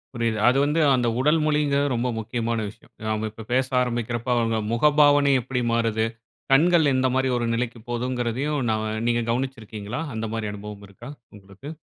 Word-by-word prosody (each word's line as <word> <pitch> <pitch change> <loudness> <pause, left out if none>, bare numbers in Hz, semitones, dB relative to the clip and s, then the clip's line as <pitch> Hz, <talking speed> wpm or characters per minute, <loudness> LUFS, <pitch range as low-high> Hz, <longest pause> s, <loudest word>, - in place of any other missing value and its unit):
புரியுது. 115 -2 -1
அது 130 +2 +4
வந்து 150 +3 0 0.2
அந்த 120 -1 0
உடல் 150 +4 +3
மொழிங்கிறது 145 -2 +1
ரொம்ப 120 +2 -1
முக்கியமான 115 +1 -2
விஷயம். - - -18 0.2
நாம 110 0 -1
இப்போ 110 +1 -10
பேச 130 +1 +2
ஆரம்பிக்கிறப்ப 120 0 -2
அவங்க 115 -1 +1
முகபாவனை 145 +2 +4
எப்டி 125 +1 -3
மாறுது, 115 -1 +1 0.5
கண்கள் 160 0 +4
எந்த 130 0 +2
மாரி 130 0 +1
ஒரு 120 - -1
நிலைக்கு 120 0 -3
போகுதுங்கிறதையும் 125 +4 -2
நா 110 - +2 0.3
நீங்க 120 0 +2
கவனிச்சிருக்கீங்களா? 115 -1 -4
அந்த 110 0 -3
மாரி 110 -2 -3
அனுபவம் 105 0 -9
இருக்கா 115 +7 -12 0.3
உங்களுக்கு? 100 +9 -11
120 Hz, 155 wpm, -24 LUFS, 115-140 Hz, 0.5 s, அது